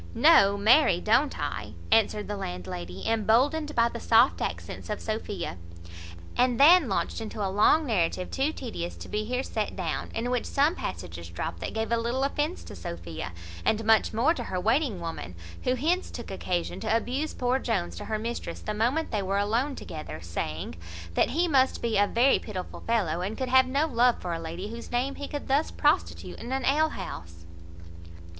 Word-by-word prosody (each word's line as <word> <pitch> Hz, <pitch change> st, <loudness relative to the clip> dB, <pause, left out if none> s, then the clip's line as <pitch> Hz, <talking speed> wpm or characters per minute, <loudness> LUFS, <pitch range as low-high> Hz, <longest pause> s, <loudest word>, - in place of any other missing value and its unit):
"No, 200 Hz, +1 st, +6 dB
marry, 210 Hz, -, +5 dB
don't 255 Hz, +9 st, +2 dB
I," -, -, -4 dB, 0.2 s
answered 215 Hz, -2 st, +3 dB
the 205 Hz, -, -3 dB
landlady, 90 Hz, -, -6 dB
emboldened 255 Hz, +8 st, +2 dB
by 235 Hz, 0 st, +4 dB
the 235 Hz, 0 st, -6 dB
soft 230 Hz, +4 st, +4 dB
accents -, -, -5 dB
of 210 Hz, -, -2 dB
Sophia; 205 Hz, -, -4 dB, 0.8 s
and 245 Hz, -1 st, +2 dB
then 310 Hz, -1 st, +7 dB
launched 190 Hz, +3 st, -1 dB
into 215 Hz, -2 st, -4 dB
a 190 Hz, -, -2 dB
long 300 Hz, +10 st, +4 dB
narrative 185 Hz, -6 st, 0 dB
too 275 Hz, +3 st, +1 dB
tedious 220 Hz, -, -5 dB
to -, -, -9 dB
be 210 Hz, 0 st, -2 dB
here 250 Hz, +3 st, -1 dB
set 215 Hz, -5 st, -3 dB
down, 175 Hz, -4 st, -3 dB
in 240 Hz, +2 st, -1 dB
which 250 Hz, -2 st, -1 dB
some 290 Hz, +4 st, +2 dB
passages -, -, -6 dB
dropt -, -, -4 dB
that -, -, -5 dB
gave 220 Hz, 0 st, -2 dB
a 235 Hz, -, +3 dB
little 235 Hz, +3 st, -1 dB
offence 295 Hz, +5 st, -1 dB
to -, -, -10 dB
Sophia, 85 Hz, -1 st, -6 dB, 0.3 s
and 220 Hz, 0 st, +1 dB
much 220 Hz, 0 st, +4 dB
more 240 Hz, +9 st, +3 dB
to 245 Hz, -7 st, -5 dB
her 185 Hz, -3 st, -2 dB
waiting 225 Hz, -, +1 dB
woman, 165 Hz, -, -6 dB, 0.3 s
who 250 Hz, -, +2 dB
hence 335 Hz, +8 st, 0 dB
took 240 Hz, -, -8 dB
occasion 180 Hz, -2 st, -2 dB
to 220 Hz, 0 st, +2 dB
abuse 265 Hz, +7 st, -3 dB
poor 250 Hz, +1 st, +1 dB
Jones 205 Hz, -9 st, -2 dB
to -, -, -6 dB
her 220 Hz, -, -1 dB
mistress 225 Hz, -6 st, -4 dB
the 215 Hz, -, -4 dB
moment 245 Hz, +10 st, 0 dB
they 210 Hz, -, 0 dB
were 195 Hz, +1 st, -1 dB
alone 230 Hz, +8 st, 0 dB
together, 155 Hz, -, -7 dB
saying, 80 Hz, -1 st, -4 dB, 0.4 s
"that -, -, +2 dB
he 340 Hz, +5 st, +1 dB
must 265 Hz, -4 st, +3 dB
be 230 Hz, -2 st, -1 dB
a 205 Hz, -, +4 dB
very 245 Hz, +6 st, +4 dB
pitiful 190 Hz, -5 st, -6 dB
fellow, 185 Hz, -8 st, +1 dB
and 200 Hz, +4 st, -3 dB
could 260 Hz, -1 st, -2 dB
have 260 Hz, 0 st, +6 dB
no 280 Hz, +4 st, +1 dB
love 245 Hz, -4 st, +3 dB
for 175 Hz, -2 st, -3 dB
a 165 Hz, -, -3 dB
lady, 170 Hz, +5 st, -5 dB
whose 235 Hz, 0 st, -8 dB
name 250 Hz, +3 st, 0 dB
he 285 Hz, -, -7 dB
would 290 Hz, -, -5 dB
thus 280 Hz, +4 st, +2 dB
prostitute 300 Hz, +4 st, 0 dB
in 240 Hz, -, -7 dB
an 265 Hz, 0 st, -1 dB
ale 310 Hz, +3 st, +3 dB
house." 85 Hz, -, -8 dB
225 Hz, 190 wpm, -27 LUFS, 190-265 Hz, 0.8 s, then